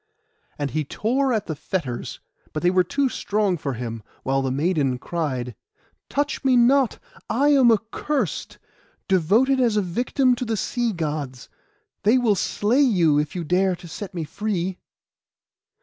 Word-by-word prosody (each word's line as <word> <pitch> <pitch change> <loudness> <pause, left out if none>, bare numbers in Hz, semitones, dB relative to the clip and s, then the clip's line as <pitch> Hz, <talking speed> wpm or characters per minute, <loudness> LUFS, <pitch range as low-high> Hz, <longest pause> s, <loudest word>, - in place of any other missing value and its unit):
And 145 -2 -2
he 155 0 -1
tore 255 - 0
at 220 -4 0
the 160 - -4
fetters, 145 -5 -4 0.3
but 155 - -3
they 175 - +4
were 185 0 +4
too 275 +10 0
strong 205 -5 0
for 145 -4 -3
him; 115 -2 -5 0.2
while 135 +1 +1
the 135 - -1
maiden 140 -2 +1
cried— 130 -5 -3 0.6
'Touch 285 +1 -1
me 260 -2 +4
not; 255 +1 +4 0.3
I 275 +6 +3
am 265 -5 +6
accursed, 225 - -2 0.5
devoted 210 +10 +3
as 235 -4 +2
a - - +4
victim 250 - +1
to - - -3
the 225 -2 -2
sea 240 +3 -1
Gods. 150 - -4 0.5
They 220 +5 +4
will 235 -4 +3
slay 215 +6 +1
you, 175 - +4
if 150 +2 -3
you 175 - -2
dare 180 +3 +2
to 175 - -12
set 185 +3 -7
me 170 - -2
free. 185 +2 -3
190 Hz, 160 wpm, -23 LUFS, 155-240 Hz, 0.6 s, am